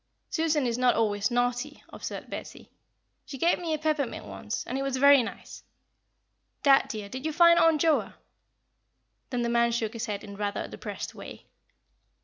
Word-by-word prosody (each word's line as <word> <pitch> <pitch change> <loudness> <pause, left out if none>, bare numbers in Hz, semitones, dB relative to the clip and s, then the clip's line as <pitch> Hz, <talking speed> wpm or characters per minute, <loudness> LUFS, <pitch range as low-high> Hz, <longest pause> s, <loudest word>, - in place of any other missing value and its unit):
"Susan 320 -4 +1
is 240 0 -1
not 250 -1 +4
always 210 -1 +1
naughty," 245 +4 -1
observed - - -7
Betty. - - -9 0.5
"She 275 - -8
gave 335 +6 +2
me 340 -2 -3
a 310 - +1
peppermint 305 -4 -2
once, - - -5
and - - -4
it 270 - -1
was 275 -1 -1
very 280 0 +7
nice. 225 - -8 1.0
Dad, 275 -1 +5
dear, 215 -2 -5
did 260 +6 -7
you 315 - -1
find 340 +2 +6
Aunt 325 -2 +4
Joa?" 320 -1 +1 1.1
Then 245 -2 -1
the - - 0
man 235 0 +2
shook 225 -2 -2
his 230 +1 -4
head 205 -1 -4
in 200 -2 -9
rather 205 0 -2
a - - -7
depressed - - -7
way. - - -10
255 Hz, 175 wpm, -27 LUFS, 230-300 Hz, 1.1 s, very